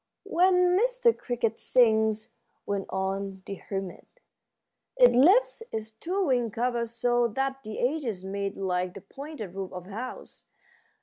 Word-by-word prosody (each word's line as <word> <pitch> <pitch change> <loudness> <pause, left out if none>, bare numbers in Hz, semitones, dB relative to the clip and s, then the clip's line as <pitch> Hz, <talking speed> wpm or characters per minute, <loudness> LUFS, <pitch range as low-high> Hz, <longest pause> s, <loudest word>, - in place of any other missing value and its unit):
"When 360 0 +3
Mr. 485 +2 +3
Cricket 230 -3 -2
sings," 220 -3 +3 0.4
went 200 -1 -2
on 190 0 -3
the 200 - -5
hermit, 195 -2 -7 0.8
"it - - +8
lifts 405 - +4
its 220 0 -4
two 360 - -2
wing 245 -4 +1
covers 235 +1 -1
so 240 +1 +1
that 270 +4 -2
the 215 -2 -7
edges 245 -8 -1
meet 200 +1 -3
like 180 -1 -1
the 195 - -8
pointed 270 - -8
roof 190 -1 -5
of 180 -1 -7
a 195 - -12
house. 245 +5 -8
230 Hz, 140 wpm, -27 LUFS, 195-275 Hz, 0.8 s, it